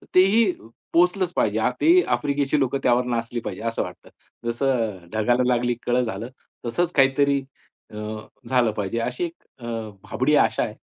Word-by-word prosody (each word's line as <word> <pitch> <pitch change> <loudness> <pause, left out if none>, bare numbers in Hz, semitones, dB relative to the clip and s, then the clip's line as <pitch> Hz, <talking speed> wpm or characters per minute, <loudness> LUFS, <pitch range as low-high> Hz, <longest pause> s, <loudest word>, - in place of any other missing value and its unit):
तेही 195 +5 +6
अ, 110 - -15 0.3
पोहोचलंच 180 +1 +3
पाहिजे. 110 +1 +1 0.2
ते 345 +3 +6
आफ्रिकेची 145 0 0
लोकं 135 0 +1
त्यावर 125 0 +3
नाचली 120 0 -2
पाहिजे - - -6
असं - - -1
वाटतं. - - -10 0.4
जसं 115 -8 -1
"ढगाला 120 +3 +2
लागली 120 0 +1
कळं" 125 +1 +2
झालं, 110 +2 -5 0.4
तसंच 165 +9 0
काहीतरी 140 +1 +3 0.5
अ, - - -11 0.5
झालं 125 -3 +3
पाहिजे 105 +1 -3
अशी 125 +6 -2
एक 170 0 -10 0.2
अ, 120 - -9 0.4
भाबडी - - +1
आशा - - +3
आहे. - - -4
125 Hz, 155 wpm, -23 LUFS, 115-145 Hz, 0.5 s, तेही